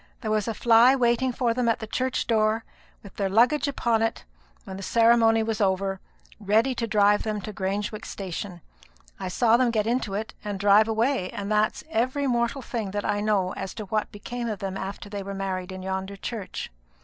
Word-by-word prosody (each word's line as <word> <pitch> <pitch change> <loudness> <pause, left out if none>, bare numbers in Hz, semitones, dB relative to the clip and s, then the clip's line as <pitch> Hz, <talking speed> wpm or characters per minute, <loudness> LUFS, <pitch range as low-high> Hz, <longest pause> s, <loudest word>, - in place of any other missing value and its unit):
There 220 -4 -2
was 215 0 0
a 225 - -2
fly 235 +4 +6
waiting 250 0 +2
for 240 -1 0
them 240 0 +1
at 230 - +2
the 220 - -6
church 255 +3 -1
door, 220 0 +1 0.4
with 200 - -13
their 195 -2 0
luggage 245 +9 +3
upon 235 -5 +1
it, 225 - -1 0.4
when 190 - -8
the - - -7
ceremony 225 +1 +4
was 220 -1 -2
over, 195 0 0 0.4
ready 220 +5 +2
to 230 -1 -3
drive 205 -1 +4
them 215 -1 -2
to 215 - -7
Grangewick 205 +3 -3
station. 185 -1 -6 0.6
I 190 - -4
saw 225 +5 +3
them 250 -1 +3
get 215 -3 0
into 230 -4 -1
it 215 +2 -4
and 205 -2 -4
drive 205 +2 +5
away; 225 -3 0
and 200 +1 -5
that's 215 0 +1
every 265 +1 0
mortal 240 +1 0
thing 225 -4 -3
that 205 +1 -3
I 205 0 0
know 200 -3 +1
as 190 -1 -6
to 215 - -6
what 215 +2 -2
became 235 +3 -5
of 215 - -3
them 195 0 -4
after 195 +1 -6
they 205 0 -5
were 195 0 -6
married 190 -1 -3
in 185 0 -7
yonder 190 +1 -3
church." 200 - -6
215 Hz, 205 wpm, -26 LUFS, 195-235 Hz, 0.6 s, fly